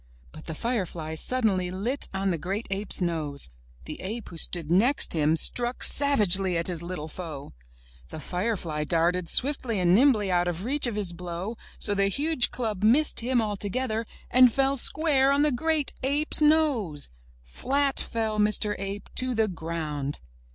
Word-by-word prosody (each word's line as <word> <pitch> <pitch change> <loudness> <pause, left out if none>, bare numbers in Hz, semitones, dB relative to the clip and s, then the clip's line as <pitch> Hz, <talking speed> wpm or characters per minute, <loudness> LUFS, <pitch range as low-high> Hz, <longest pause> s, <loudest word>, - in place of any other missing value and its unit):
But - - -13
the 160 - -6
firefly 180 -8 -3
sud 255 +10 +1
denly 185 -4 0
lit 230 +9 -2
on 195 0 -1
the 170 - -3
great 195 +8 -4
ape's 195 0 -2
nose. 150 - -2 0.3
The - - -8
ape 220 +4 -6
who 170 - -11
stood 165 -1 -1
next 235 +11 +3
him 155 -1 +2
struck 240 +9 +2
savagely 195 -10 +4
at 165 - -2
his 175 -3 -3
little 170 -3 -6
foe. 155 -4 -8 0.6
The - - -8
firefly 180 -3 -3
darted 170 +2 0
swiftly 255 -6 +3
and 175 -1 +3
nimbly 215 -4 +3
out 175 0 +1
of 175 +3 -4
reach 280 +1 +1
of 235 - -4
his 200 -5 0
blow, 180 +5 -6 0.2
so 205 - 0
the 200 0 +1
huge 280 +5 +1
club 220 -5 -4
missed 270 +8 +3
him 240 0 0
altogether 215 +2 -3 0.2
and 255 0 +6
fell 270 +2 +1
square 275 0 +3
on 280 +1 +2
the 300 - +2
great 310 +3 -1
ape's 290 +4 0
nose! 285 - +2 0.3
Flat 275 - 0
fell 220 -2 -2
Mr. 210 0 +2
Ape 195 +1 -6
to 255 -1 0
the 220 -1 +1
ground 160 -5 -5
205 Hz, 165 wpm, -26 LUFS, 175-255 Hz, 0.6 s, and